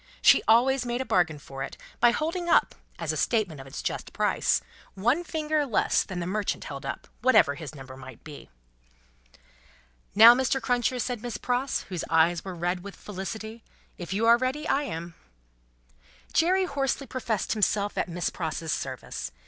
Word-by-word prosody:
She - - +6
always 250 +4 +4
made 240 0 -2
a 260 - -2
bargain 175 -8 +1
for 135 -1 -9
it, - - -5 0.2
by 240 - +6
holding 335 +7 -2
up, - - +4 0.2
as - - -2
a - - -3
statement 200 - 0
of 135 - -12
its 135 - -7
just - - -4
price, - - +1 0.4
one 240 - +1
finger 310 -2 -1
less 255 -7 +2
than 185 -3 -6
the 170 - -3
merchant 200 +2 -2
held 140 -1 -7
up, - - -5
whatever 225 - +5
his 155 +1 -8
number 135 -2 -10
might 130 -3 -12
be. 150 -2 -11 1.7
"Now, 225 +3 +10
Mr. 260 +1 +1
Cruncher," 245 0 0
said 245 -2 -3
Miss 240 -3 -4
Pross, 250 +4 -1
whose 180 -3 -5
eyes 165 +1 +3
were 190 -2 -6
red 175 +1 -2
with 200 0 -9
felicity; 220 +3 -7 0.4
"if 175 0 -7
you 210 +4 0
are 235 +1 +6
ready, 265 +5 -2
I 290 +1 +1
am." 170 -6 -6 1.2
Jerry 370 +3 +3
hoarsely 275 -3 -1
professed 240 -5 -2
himself 205 -1 +1
at - - -1
Miss 175 +1 -2
Pross's 160 -1 -3
service. - - -4
215 Hz, 175 wpm, -27 LUFS, 170-255 Hz, 1.7 s, Now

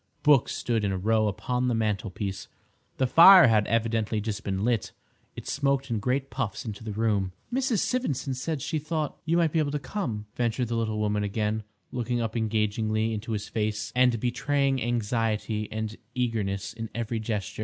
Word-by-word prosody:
Books 145 -4 +4
stood 115 -3 -1
in 100 - +1
a 95 - -1
row 110 +3 +2
upon 125 +5 -1
the 120 - +1
mantelpiece. 105 -3 -2 0.5
The 130 - +2
fire 175 +7 +9
had 105 -2 +3
evidently 115 -1 0
just 105 0 -4
been 95 +1 -1
lit. 120 -4 0 0.4
It - - -8
smoked 140 -2 0
in 110 - 0
great 130 +5 -1
puffs 110 +2 -3
into 110 -1 -6
the 110 - -4
room. 100 -3 0 0.2
"Mrs. 255 -5 +1
Sivendson 145 - -1
said 135 +2 -3
she 155 0 -1
thought 155 -1 -3
you 165 +2 +2
might 165 -3 +3
be 165 - +1
able 150 -2 +1
to 150 - -1
come," 130 - -4
ventured 120 0 0
the 120 - -1
little 110 -2 -1
woman 105 -1 0
again, 105 +1 -1 0.3
looking 120 0 -1
up 115 -1 -2
engagingly 110 0 0
into 110 +1 -4
his 105 -1 -3
face 110 0 -2
and 125 -2 +4
betraying 135 +2 0
anxiety 110 -2 -1
and 110 0 -3 0.2
eagerness 105 -5 -1
in 115 -1 -6
every 115 0 -2
gesture. 110 -2 -4
115 Hz, 180 wpm, -27 LUFS, 105-130 Hz, 0.5 s, fire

